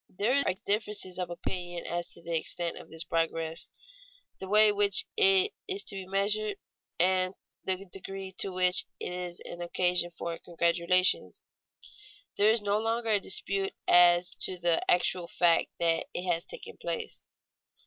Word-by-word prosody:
_ - - -30
There 245 +8 +2
are - - +1
differences 205 -3 -2
of 180 -1 -3
opinion 175 0 -5
as 175 0 -4
to - - -16
the 170 0 -3
extent 170 +1 -2
of - - -12
this 160 0 -2
progress, 165 0 -2 0.7
the 190 - -7
way 215 +1 +7
in 205 - 0
which 205 - +5
it 390 -1 +5
is 390 0 0
to - - -5
be 190 -1 -7
measured, 205 +1 0 0.4
and 185 +1 +2 0.3
the 190 +1 -2
degree 195 0 -8
to 195 - 0
which 180 0 +5
it - - -4
is 180 -1 -6
an 175 - -9
occasion 175 0 +1
for 170 0 -6
congratulation. 170 +2 +1 1.0
There 205 +1 +4
is 220 -1 +2
no 205 +1 +1
longer 225 +1 -1
any 210 -2 +3
dispute 195 0 -2
as 175 0 +5
to 185 - -2
the 170 -1 +1
actual 180 0 +1
fact 170 -1 +2
that 165 -1 +1
it 180 - -3
has 175 -2 -1
taken - - -10
place. 450 -2 -5
185 Hz, 165 wpm, -29 LUFS, 175-205 Hz, 1.0 s, way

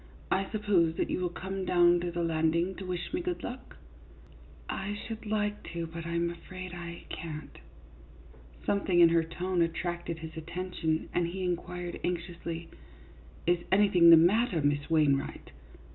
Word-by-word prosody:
" - - -22
I 195 0 +1
suppose 195 -7 +2
that - - -1
you - - 0
will 180 -1 0
come 190 +2 -5
down 175 -1 +5
to 175 0 -2
the 170 0 -2
landing 165 +2 +1
to 190 - -6
wish 180 - -4
me 350 - 0
good 355 0 -3
luck? 250 +2 -7 0.4
" - - -22
" - - -22
I 200 +2 -3
should 220 +1 -7
like 210 -1 -1
to, 170 -1 -2
but 165 0 -7
I 170 - -3
'm 170 0 +1
afraid 185 +1 -8
I 170 -1 -7
can't." 155 -2 -7 1.1
Something 195 -3 +2
in 170 -1 +8
her 165 0 +3
tone 175 +2 -1
attracted 170 0 -2
his 160 0 -8
attention, 160 -1 -2
and 175 -1 +1
he 185 +2 -4
inquired, 175 0 -3
anxiously, 170 -1 -4 0.4
" 70 +1 -22
Is 175 0 +3
anything 190 -4 +6
the 165 - +11
matter, 185 +3 +4
Miss 145 +1 +1
Wainwright 150 -4 +1
175 Hz, 175 wpm, -30 LUFS, 165-185 Hz, 1.1 s, the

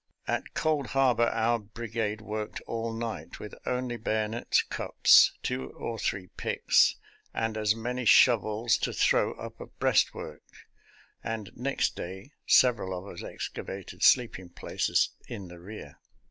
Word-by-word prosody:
At - - -3
Cold 150 -4 0
Harbor 120 -3 +4
our 115 +1 +1
brigade 110 0 -4
worked 110 -1 -5
all 115 0 -4
night 115 -1 -5
with 105 - -8
only 125 -1 -1
bayonets, 110 0 0
cups, - - +5
two 65 0 -3
or 115 -1 -5
three 95 -3 -2
picks, - - +3 0.4
and 115 -1 -1
as 105 0 +2
many 125 +2 -3
shovels 110 -1 +4
to - - -1
throw - - +2
up - - -9
a - - -7
breastwork, - - 0 0.8
and 110 -2 -4
next 135 +3 -1
day 95 +9 -7 0.2
several 105 -7 +4
of 90 - -8
us 85 - -8
excavated 95 -1 -7
sleeping 110 -8 +3
places - - 0 0.2
in 95 -3 -7
the 85 0 -11
rear. 90 -5 -10
110 Hz, 135 wpm, -28 LUFS, 100-120 Hz, 0.8 s, cups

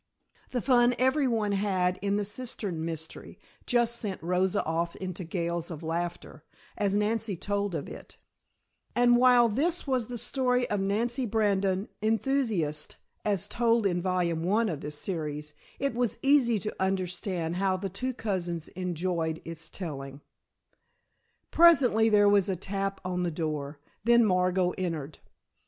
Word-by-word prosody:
The 245 -3 -2
fun 245 -2 +4
every 260 +2 +3
one 220 -4 0
had 190 -2 0
in 200 0 0
the 205 0 0
cistern 205 -6 -4
mystery 160 -1 -6 0.3
just 235 -1 +2
sent 205 -5 -4
Rosa 180 +2 +1
off 165 +1 -1
into 185 -1 -5
gales 170 0 -2
of 165 -1 -7
laughter 170 +2 -4 0.3
as 200 -1 0
Nancy 210 -1 0
told 200 0 -2
of 145 - -4
it, - - -11 0.8
and 240 0 +5
while 245 -1 +6
this 310 +11 0
was 255 -5 0
the 245 - -5
story 250 +1 +1
of 205 - +1
Nancy 235 +6 0
Brandon: 200 -2 +1
Enthusiast, 220 - 0 0.3
as 200 -2 0
told 230 0 +2
in 175 -2 +1
volume 175 -3 0
one 210 +6 +2
of 155 -5 -4
this 150 0 -6
series, 150 -4 -4 0.2
it 275 -1 -1
was 240 -1 0
easy 270 -5 +4
to 210 +1 -4
understand 180 -2 -1
how 190 0 +1
the 195 +1 -3
two 225 +8 -3
cousins 175 -7 -3
enjoyed 170 -2 -2
its 165 0 -7
telling. 140 -6 -7 1.3
Presently 270 -10 +5
there 205 -1 +5
was 205 -1 +4
a 190 - 0
tap 195 +1 -3
at 180 -1 -1
the 175 - 0
door, 155 -3 -3 0.3
then 235 0 +5
Margot 180 -1 +2
entered. 160 -5 -4
195 Hz, 145 wpm, -28 LUFS, 170-230 Hz, 1.3 s, while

